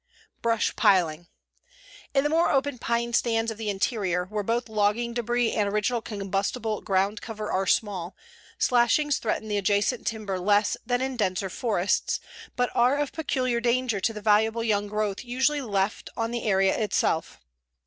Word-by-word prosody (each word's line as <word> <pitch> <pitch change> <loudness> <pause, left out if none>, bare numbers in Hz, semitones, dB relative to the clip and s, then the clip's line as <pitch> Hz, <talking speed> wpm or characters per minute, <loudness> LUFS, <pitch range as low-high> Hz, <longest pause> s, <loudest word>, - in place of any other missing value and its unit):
BRUSH 230 -2 +1
PILING 170 -3 +2 0.9
In 275 - +4
the 295 - +1
more 330 +2 +3
open 270 -2 0
pine 235 0 -1
stands 225 -1 +1
of 220 - -9
the 220 -2 -2
interior, 195 -3 0
where 210 +2 -3
both 230 +4 -1
logging 220 +2 0
debris 240 0 0
and 205 -2 0
original 210 +3 0
combustible 200 +1 -2
ground 195 +2 0
cover 215 -2 -5
are 190 0 0
small, 190 -5 0 0.4
slashings 250 +4 +3
threaten 220 -1 -2
the 210 -1 -1
adjacent 205 +5 0
timber 210 -4 -2
less 205 +3 +2
than 245 0 +1
in 265 -1 -2
denser 195 -2 -1
forests, 205 -5 0 0.4
but 245 0 0
are 250 +4 +3
of 290 -1 -1
peculiar 260 -6 -1
danger 240 -2 +1
to 195 - 0
the 215 -1 -7
valuable 220 +2 +3
young 205 -2 +1
growth 210 0 -2
usually 265 +4 +1
left 200 -4 -1
on 230 0 -1
the 240 0 -3
area 195 -2 +3
itself. 185 -6 0
220 Hz, 160 wpm, -26 LUFS, 200-240 Hz, 0.9 s, In